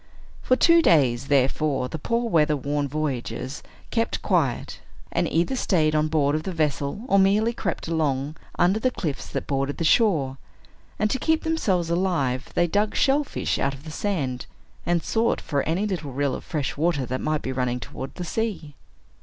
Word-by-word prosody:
For 255 - +3
two 335 +5 +5
days, 135 - +3
therefore, 135 0 +1
the 160 - -6
poor 235 +8 0
weather 155 -6 +3
worn 145 +1 -1
voyagers 140 -1 -3 0.3
kept 230 -1 -1
quiet, - - 0 0.3
and - - 0
either 175 +11 +1
staid 160 -10 +2
on 155 0 +2
board 150 -2 +2
of 155 - 0
their 180 +2 -5
vessel, 145 - -1
or 200 -5 +4
merely 210 +4 +3
crept - - -3
along 150 -3 -1 0.2
under 190 +5 +3
the 255 - +2
cliffs 155 - -4
that - - -4
bordered 135 0 -1
the - - -2
shore; 155 - +3 0.6
and 215 - +2
to 260 - 0
keep 320 +3 +1
themselves 190 - 0
alive, 165 -8 0
they 175 - +4
dug 205 +5 0
shellfish 280 +1 +1
out 140 0 0
of 135 - -14
the 155 - -8
sand, 150 -9 -2 0.4
and 175 -1 +1
sought 230 +1 +1
for 140 -1 -1
any 180 +6 +1
little 170 -9 -3
rill 140 0 0
of - - -5
fresh 150 -6 -3
water 150 -3 +1
that 130 +2 -3
might 155 -1 -1
be 130 - -2
running 125 -1 -1
towards 130 +4 -7
the 180 - -5
sea. 195 -6 -3
155 Hz, 180 wpm, -24 LUFS, 140-195 Hz, 0.6 s, two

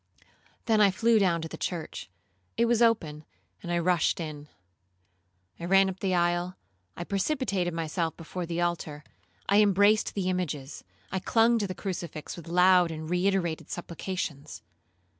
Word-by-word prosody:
Then 220 -2 +3
I 205 - +6
flew 225 +3 +3
down 170 -4 +1
to - - -4
the - - -9
church; 170 - -5 0.5
it 235 - +3
was 235 0 +2
open, 165 -11 +2 0.4
and 175 - -5
I 175 - +1
rushed 175 0 +1
in. 150 -3 -6 1.1
I 170 - -5
ran 195 +1 +4
up 190 - -11
the 190 -2 0
aisle, 175 +1 0 0.4
I 175 - -4
precipitated 200 - -1
myself 165 0 -2
before 170 +1 -6
the 170 +1 -2
altar, 160 -4 -2 0.4
I 200 +2 +5
embraced 205 +1 +3
the 195 -3 -1
images, 150 -7 -3 0.3
I 190 - -1
clung 230 +4 +3
to 205 - -1
the 185 - -5
crucifix 170 -6 -5
with 170 -2 -11
loud 180 0 +5
and 160 0 -6
reiterated 180 -2 0
supplications. 170 -4 -5
180 Hz, 155 wpm, -28 LUFS, 165-195 Hz, 1.1 s, I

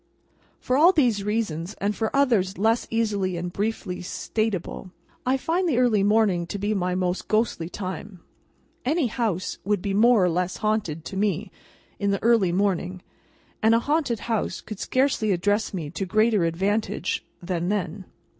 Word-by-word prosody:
For 255 - 0
all 330 +5 +7
these 245 - +2
reasons, 200 -5 -2
and 205 +1 -1
for 220 -1 -1
others 225 -9 +2
less 225 +4 +2
easily 205 -5 0
and 175 +1 -4
briefly 205 -3 -2
statable, 195 0 -3 0.4
I 260 +1 +3
find 340 +6 0
the 260 - +1
early 240 -5 +3
morning 200 -4 +2
to 205 - -4
be 205 +2 -1
my 180 -2 0
most 180 0 -1
ghostly 215 -6 0
time. 190 0 -6 0.6
Any 300 +3 +1
house 215 -6 -2
would 205 0 +1
be 195 +2 -2
more 220 -1 +5
or - - +3
less 180 +2 -1
haunted, 205 -8 -1
to 195 - -6
me, 195 -1 0 0.5
in 200 - 0
the 200 -1 -1
early 225 -6 +4
morning; 185 -1 -1 0.6
and 220 +1 +5
a - - +4
haunted 280 -4 0
house 225 -3 -2
could 215 -3 -8
scarcely 255 -5 +1
address 205 +4 +1
me 160 -6 -5
to 190 +2 -3
greater 215 -1 +3
advantage 200 +5 -1 0.2
than 175 -1 -2
then. 190 -2 -2
205 Hz, 165 wpm, -25 LUFS, 185-225 Hz, 0.6 s, all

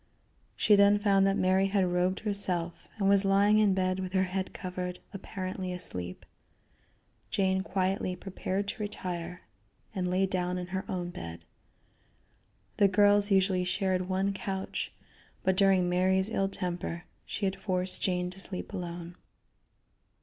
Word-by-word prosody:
She 210 - +5
then 200 +1 +6
found 200 -2 +3
that 195 - +2
Mary 190 +1 +3
had 195 -1 +2
robed 180 +1 0
herself 185 -5 -1
and 195 -2 +1
was 200 0 +5
lying 200 +2 +4
in 205 -3 +4
bed 185 0 0
with 185 0 -4
her 190 -1 +3
head 190 +1 -3
covered, 180 0 -5 0.2
apparently 185 -1 -5
asleep. 90 - -2 1.0
Jane 190 -1 +1
quietly 190 -1 -1
prepared 195 +1 -3
to 225 - -5
retire, 180 -4 -4 0.5
and 180 -2 -1
lay 185 +2 +2
down 180 -1 -1
in 180 - -3
her 190 - -2
own 175 -2 -3
bed. 85 - -8 1.3
The 200 - +6
girls 205 +1 +4
usually 190 -2 +3
shared 185 0 0
one 190 +1 +1
couch, 195 0 -4 0.5
but 190 - +2
during 190 -2 +4
Mary's 190 +3 +2
ill 195 -3 +1
temper 175 -2 -3 0.2
she 205 - -3
had 190 0 0
forced 185 -1 -1
Jane 180 -1 0
to 190 - -8
sleep 195 +1 -4
alone. 175 -2 -6
190 Hz, 145 wpm, -30 LUFS, 180-195 Hz, 1.3 s, then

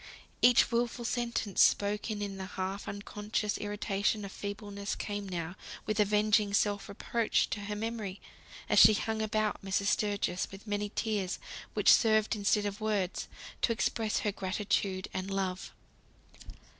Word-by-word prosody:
Each 245 -1 +6
wilful 235 0 0
sentence 235 -4 0
spoken 205 +1 +2
in 195 -1 -5
the 190 0 -5
half 190 +2 -3
unconscious 210 +1 -3
irritation 205 0 -1
of 195 - -7
feebleness 200 0 -5
came 205 -1 -4
now 175 -1 -4 0.3
with 215 0 -1
avenging 210 0 +3
self 205 -1 +1
reproach 225 +2 0
to 210 - -2
her 210 0 -3
memory, 215 -3 -4 0.5
as - - +4
she 215 - +9
hung 220 +1 -2
about 215 0 0
Mrs. 195 0 -1
Sturgis, 205 -3 0
with 195 +2 -11
many 205 -1 -2
tears, 205 -5 -1 0.4
which - - +7
served 220 -1 +3
instead 205 0 +2
of 205 +1 -4
words 205 -4 -1 0.3
to - - +2
express 220 -1 0
her 210 - 0
gratitude 195 -1 -1
and 185 +1 -3
love. 190 -1 -2
205 Hz, 145 wpm, -31 LUFS, 200-215 Hz, 0.5 s, she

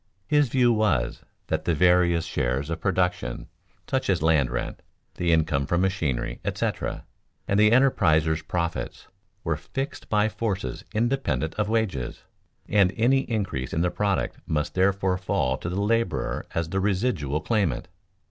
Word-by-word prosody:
His 145 +3 +3
view 120 -1 +4
was 100 - +1 0.2
that - - -2
the 85 - +2
various 90 0 +4
shares 65 +5 -1
of 80 - -4
production, 90 -2 -1 0.4
such 130 -4 -1
as 90 -5 +1
land 75 -5 +3
rent, - - -4 0.3
the 85 -1 0
income 75 -4 +2
from 85 0 +1
machinery, 90 -10 -1
etc., - - -2 0.4
and 100 - +2
the 105 0 +6
enterpriser's 80 - +3
profits, 85 +1 -3 0.4
were - - 0
fixed 135 +1 -5
by 105 0 +3
forces 105 -2 -3
independent 110 - 0
of 105 0 -1
wages, 105 - -1 0.4
and 100 -3 +4
any 125 +4 +4
increase 95 - -2
in 80 - +1
the 90 0 +1
product 100 -2 -1
must 75 -1 -1
therefore 95 0 +1
fall 65 -7 0
to 85 - -5
the 90 +3 -2
laborer 115 +3 0
as 85 -1 -1
the 95 - -1
residual 95 - 0
claimant. 85 - 0
95 Hz, 150 wpm, -25 LUFS, 80-110 Hz, 0.4 s, the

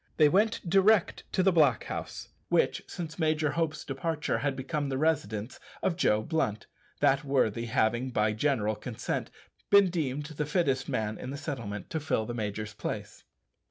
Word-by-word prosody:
They 150 -2 +6
went 205 +2 +2
direct 195 +2 +3
to 185 - +2
the 190 - +5
blockhouse, 145 -8 +1 0.2
which, - - +2
since 165 -1 -6
Major 155 -2 +1
Hope's 160 -1 -2
departure, 150 +3 -2
had 145 -2 -1
become 140 +2 -2
the 135 - -1
residence 130 -8 -1 0.2
of 180 - +1
Joe 110 -11 +2
Blunt 110 - -1 0.4
that 135 +1 +4
worthy 125 -5 +1
having, 120 +2 +1
by 105 -3 +1
general 110 -3 +1
consent, 115 +1 -4 0.4
been 200 -3 +6
deemed 150 -4 -2
the 150 -1 -4
fittest 140 -6 +1
man 110 0 -2
in - - -6
the 140 - -4
settlement 115 - -5
to 160 - -1
fill 145 -7 0
the 120 - -4
major's 105 -1 -4
place. 105 - -6
140 Hz, 160 wpm, -29 LUFS, 110-160 Hz, 0.4 s, They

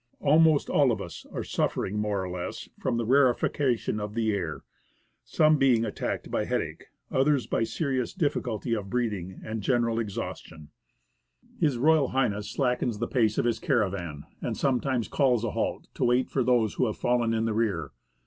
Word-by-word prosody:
Almost 155 0 +4
all 140 -4 +3
of 115 - -1
us 85 - -8
are - - -4
suffering 105 +2 -1
more 105 -2 -1
or 90 - -4
less 90 -1 -5
from 120 - -1
the 120 - -1
rarefaction 125 -2 +2
of 105 +1 -5
the 110 -2 +1
air, 90 -6 -3 0.6
some 155 -1 +3
being 125 -4 +4
attacked 105 - -4
by - - 0
headache, - - -3 0.3
others 135 -1 +2
by - - 0
serious 130 0 -1
difficulty 125 - -1
of 100 -3 -3
breathing 100 -6 -2
and 110 0 -4
general 115 0 +1
exhaustion. 95 -8 -6 0.9
H.R. 150 0 +3 0.3
H. 105 0 -6
slackens 125 -4 0
the 120 +2 -2
pace 110 -5 +1
of - - +1
his 115 -2 +1
caravan, 95 - -1 0.2
and - - -3
sometimes 130 -3 0
calls 125 -5 +2
a 115 - -1
halt, - - -2
to - - -1
wait 125 +1 +2
for 135 - +1
those 120 -4 +2
who 125 - +1
have 110 - -3
fallen 120 -2 +1
in 110 0 0
the 115 - 0
rear. 100 -10 -1
115 Hz, 170 wpm, -27 LUFS, 105-130 Hz, 0.9 s, Almost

